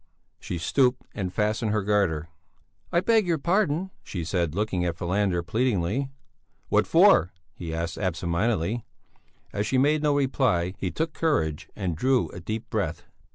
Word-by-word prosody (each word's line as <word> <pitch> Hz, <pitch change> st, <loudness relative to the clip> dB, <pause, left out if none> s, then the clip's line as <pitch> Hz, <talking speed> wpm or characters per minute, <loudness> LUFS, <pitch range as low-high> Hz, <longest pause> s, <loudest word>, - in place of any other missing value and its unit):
She 90 Hz, -, -4 dB
stooped 125 Hz, -, +2 dB
and 95 Hz, -4 st, -3 dB
fastened 105 Hz, +2 st, 0 dB
her 105 Hz, -1 st, 0 dB
garter. 95 Hz, -6 st, +1 dB, 0.6 s
"I 170 Hz, -1 st, +3 dB
beg 220 Hz, 0 st, +3 dB
your 170 Hz, -2 st, +2 dB
pardon," 180 Hz, +2 st, +1 dB
she 90 Hz, -4 st, -5 dB
said, 85 Hz, -3 st, -1 dB
looking 100 Hz, -3 st, 0 dB
at 85 Hz, -2 st, -1 dB
Falander, 90 Hz, -1 st, 0 dB
pleadingly. 110 Hz, +4 st, 0 dB, 0.6 s
"What -, -, +3 dB
for?" 90 Hz, -, +5 dB, 0.2 s
he 85 Hz, -3 st, -6 dB
asked, 80 Hz, +1 st, -3 dB
absent 90 Hz, -3 st, -2 dB
mindedly. 105 Hz, +3 st, 0 dB, 0.7 s
As 100 Hz, +1 st, -1 dB
she 130 Hz, -, +1 dB
made 145 Hz, +3 st, +3 dB
no 150 Hz, -1 st, +2 dB
reply, 130 Hz, -10 st, +1 dB
he 95 Hz, -, -1 dB
took 160 Hz, -, -2 dB
courage 80 Hz, -, 0 dB
and 95 Hz, -5 st, -2 dB
drew 130 Hz, +7 st, +2 dB
a -, -, -9 dB
deep 110 Hz, +5 st, -4 dB
breath. -, -, -2 dB
105 Hz, 155 wpm, -26 LUFS, 85-135 Hz, 0.7 s, for